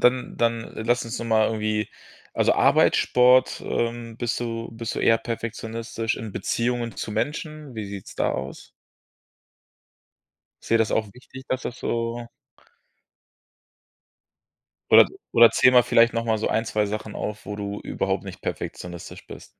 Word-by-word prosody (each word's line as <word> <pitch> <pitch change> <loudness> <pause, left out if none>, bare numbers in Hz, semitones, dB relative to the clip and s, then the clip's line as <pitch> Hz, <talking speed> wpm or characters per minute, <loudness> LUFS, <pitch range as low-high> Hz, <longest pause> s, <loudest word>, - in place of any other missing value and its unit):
dann 125 +1 +2
dann 115 -1 0
lass 120 +2 0
uns 115 +1 -5
doch - - -5
mal 110 -1 +3
irgendwie 110 -1 -1 0.5
also - - +3
Arbeit, - - +4
Sport, 125 +1 +4
ähm, 115 -1 -3
bist 120 0 -2
du 115 -1 -4
bist 115 -1 -5
du - - -1
eher 115 0 +4
perfektionistisch. 115 0 -4
In 110 -3 -7
Beziehungen 120 +1 -2
zu 105 - -4
Menschen, 150 -1 -4
wie 110 -2 -4
sieht's 100 -1 -9
da - - +1
aus? 65 +1 -6 1.9
Ist - - -12
dir 115 - +6
das 110 -1 +1
auch 110 - +1
wichtig, 130 +1 -12
dass 130 0 -1
das 125 - -5
so 115 0 -2 2.6
Oder - - +9 0.3
oder 115 0 +8
zähle 130 - +5
mal 125 -1 +7
vielleicht 115 0 +4
noch 115 0 -1
mal 110 -1 +1
so 110 - -1
1, 110 +2 0
2 105 -1 0
Sachen 105 +1 -5
auf, 105 0 -5
wo 105 - -5
du 100 0 -4
überhaupt - - -2
nicht - - -9
perfektionistisch 85 -1 -6
bist. - - -10
115 Hz, 155 wpm, -24 LUFS, 110-120 Hz, 2.6 s, Oder